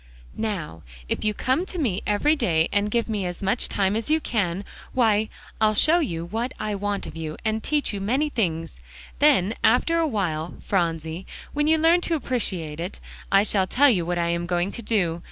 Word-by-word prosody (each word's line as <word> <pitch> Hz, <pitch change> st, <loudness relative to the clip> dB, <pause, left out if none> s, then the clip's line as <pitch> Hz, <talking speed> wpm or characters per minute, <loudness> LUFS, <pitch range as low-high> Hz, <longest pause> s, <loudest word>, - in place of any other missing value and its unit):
"Now 180 Hz, -, -4 dB, 0.3 s
if -, -, -2 dB
you 215 Hz, -1 st, 0 dB
come 260 Hz, -, +1 dB
to 370 Hz, -, -6 dB
me 225 Hz, -, 0 dB
every 250 Hz, +9 st, +3 dB
day, 165 Hz, -, +2 dB
and 205 Hz, 0 st, +1 dB
give 235 Hz, +1 st, 0 dB
me 210 Hz, -3 st, -2 dB
as 175 Hz, +2 st, -6 dB
much 195 Hz, +5 st, +1 dB
time 195 Hz, 0 st, +1 dB
as 225 Hz, +4 st, -2 dB
you 315 Hz, +1 st, +3 dB
can, 200 Hz, -, -1 dB, 0.3 s
why, 220 Hz, -3 st, +2 dB, 0.3 s
I'll 215 Hz, 0 st, +4 dB
show 315 Hz, +10 st, +5 dB
you 170 Hz, -, -2 dB
what 230 Hz, +8 st, -3 dB
I 215 Hz, -, -2 dB
want 205 Hz, 0 st, -2 dB
of -, -, -8 dB
you, 160 Hz, -1 st, -5 dB
and 220 Hz, 0 st, 0 dB
teach 295 Hz, -3 st, 0 dB
you 200 Hz, -, -4 dB
many 260 Hz, +10 st, +1 dB
things. 165 Hz, -, -2 dB, 0.4 s
Then 190 Hz, +3 st, +4 dB
after 330 Hz, +9 st, +3 dB
a 325 Hz, -, +2 dB
while, 175 Hz, -, -2 dB
Phronsie, 165 Hz, -1 st, -1 dB, 0.3 s
when 295 Hz, +1 st, +1 dB
you 320 Hz, +1 st, +4 dB
learn 330 Hz, +3 st, +4 dB
to 340 Hz, -, 0 dB
appreciate 185 Hz, -, -3 dB
it, 175 Hz, +3 st, -5 dB, 0.3 s
I 195 Hz, 0 st, +6 dB
shall 195 Hz, -3 st, +1 dB
tell 280 Hz, +7 st, +5 dB
you 180 Hz, -7 st, +1 dB
what 175 Hz, +1 st, -2 dB
I 170 Hz, 0 st, 0 dB
am 170 Hz, 0 st, -1 dB
going 175 Hz, +2 st, 0 dB
to -, -, -6 dB
do. 185 Hz, -7 st, 0 dB
205 Hz, 205 wpm, -24 LUFS, 175-245 Hz, 0.4 s, I